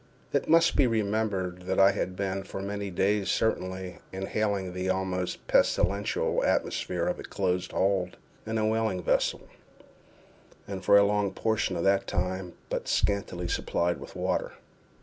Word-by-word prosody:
It - - 0
must 165 0 +5
be 135 - +4
remembered 100 -5 -1
that - - +1
I 95 0 +7
had 90 - -3
been, 95 0 -2
for 95 - -7
many 100 +1 -4
days 100 +2 +1
certainly, 95 -4 -1
inhaling 95 -1 -2
the 90 +1 -2
almost 95 -1 -2
pestilential 100 +3 +2
atmosphere - - 0
of - - -1
a - - -7
close 90 -2 -1
hold 95 -1 0 0.3
in 110 +1 -2
a 110 - +1
whaling 110 -4 0
vessel, - - +1 1.3
and 95 -1 -5
for 100 - +6
a 100 - +7
long 105 -1 +1
portion 110 -4 0
of 85 - -2
that 100 0 +2
time 90 0 -2 0.2
but - - -2
scantily 100 -3 0
supplied 85 0 0
with - - -10
water. - - -1
95 Hz, 150 wpm, -28 LUFS, 90-105 Hz, 1.3 s, I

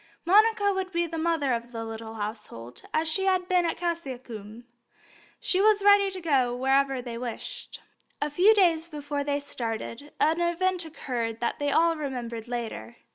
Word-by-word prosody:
Monica 410 +2 +4
would 380 -1 -3
be 340 -1 +1
the 335 0 -6
mother 315 -5 +1
of 235 +1 -4
the 225 -1 -5
little 225 0 -7
household, 205 - -7
as 315 +1 0
she 385 +5 0
had 370 -1 +2
been 360 -2 +3
at - - -2
Cassiacum; 250 - -5 0.8
she 375 - +1
was 420 -1 +4
ready 405 -1 +6
to 380 -1 -5
go 270 -8 +1
wherever 270 0 +2
they 235 -1 -6
wished. 240 -2 -6 0.4
A 295 0 -1
few 385 +9 +5
days 340 -4 +3
before 290 -2 -3
they 285 0 0
started 235 +1 -5
an 325 +3 +2
event 350 +1 0
occurred 240 -8 -4
which 235 - 0
they 290 0 0
all 330 +3 +4
remembered 245 -6 -5
later. 225 - -5
290 Hz, 170 wpm, -27 LUFS, 235-345 Hz, 0.8 s, ready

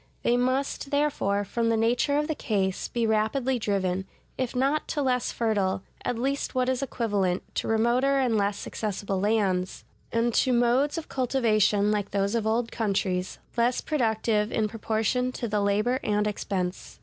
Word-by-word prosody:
They 240 - +3
must, 260 +3 0
therefore, 275 -9 +1
from 230 +3 0
the 225 - +2
nature 240 +6 +2
of 300 0 0
the 315 - 0
case, 195 -8 -1
be 235 -1 -1
rapidly 225 +4 +1
driven, 190 -3 -1 0.3
if 255 -1 -3
not 275 +4 +1
to 295 - -1
less 250 -2 +1
fertile, 200 -5 0 0.2
at 245 - -1
least 275 +3 -2
what 255 0 +2
is 260 0 0
equivalent, 205 -8 -1
to - - -1
remoter 240 +5 +2
and 255 -4 +2
less 200 -1 0
accessible 200 -2 -3
lands, 195 -3 0 0.3
and 230 +1 +1
to 255 +2 +3
modes 245 +6 +2
of 325 - -5
cultivation 215 -5 +2
like 205 -2 -1
those 200 +1 0
of 225 -2 0
old 230 +1 0
countries, 190 -4 -1 0.2
less 240 +1 +2
productive 220 -5 0
in 215 -1 +1
proportion 225 +3 -1
to 235 - -3
the 210 -1 0
labor 210 +6 +1
and 210 0 +1
expense. 185 - -3
225 Hz, 165 wpm, -27 LUFS, 205-250 Hz, 0.3 s, They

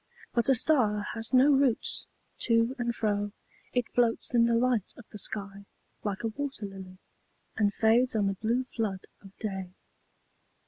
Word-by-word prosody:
'But 235 +2 +1
a 265 - +6
star 225 -6 +4
has 225 0 -2
no 265 +3 +5
roots: 270 -4 +1 0.3
to 230 +2 +2
and 240 -1 -1
fro 205 -2 -1 0.4
It 245 -2 0
floats 240 0 +1
in 235 -1 +5
the 235 0 +2
light 235 -4 0
of 245 - -13
the 210 - -7
sky, 200 -1 -2 0.4
like 205 0 -3
a 225 - 0
wat«r 270 -3 -5
]ily. 190 -1 -11 0.6
And 205 -2 +2
fades 230 +4 +2
on 210 -2 +2
the 195 - +1
blue 230 +6 -1
flood 215 -6 -4 0.2
of 195 0 -15
day. 190 -4 -5
225 Hz, 165 wpm, -28 LUFS, 205-245 Hz, 0.6 s, a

